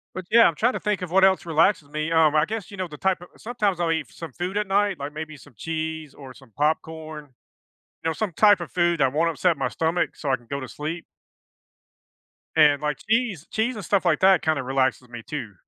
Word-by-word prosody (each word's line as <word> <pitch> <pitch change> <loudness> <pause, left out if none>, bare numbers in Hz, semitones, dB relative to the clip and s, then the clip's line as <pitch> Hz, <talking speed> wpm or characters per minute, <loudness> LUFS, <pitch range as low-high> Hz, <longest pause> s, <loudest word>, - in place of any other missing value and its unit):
But 185 - -5
yeah, 230 +1 +7
I'm 165 - -2
trying 245 +8 +2
to - - -4
think 210 -3 -1
of 180 - -5
what 190 0 +5
else 190 -2 +3
relaxes 160 -1 +2
me. 155 +2 -3
Um, 160 -2 +4
I 150 - +4
guess, 220 +2 -5
you 200 - -9
know, 185 -2 -3
the 150 - -10
type 190 +2 0
o - - -10
sometimes 210 -6 -1
I'll 170 -1 +1
eat 155 -8 -3
some 165 -4 -9
food 180 +7 -4
at 210 0 0
night, 200 0 +1
like, 140 +1 -6
maybe 155 0 -7
some 145 -1 -17
cheese 160 +2 -4
or 130 -3 -12
some - - -18
popcorn, 155 0 -2 0.8
you 165 - 0
know, - - -1
some 205 -1 -3
type 205 0 +5
of 170 - -7
food 175 -2 +1
that 135 -2 +3
won't 165 +3 +1
upset 165 +1 +1
my - - -1
stomach 165 +2 -1
so 145 - -4
I 130 - +3
can 120 - -17
go 140 0 -3
to 130 - -7
sleep 155 +6 -5 1.5
and, 145 -1 +5
like, 150 -2 -1
cheese 220 - 0
cheese 230 +3 -1
and 205 - -6
stuff 200 -2 +1
like 170 -3 +2
that, 190 0 +5
kinda, 155 -4 0
relaxes 130 -1 0
me, 120 -1 -9
too. 115 -8 -6
160 Hz, 235 wpm, -24 LUFS, 150-190 Hz, 1.5 s, yeah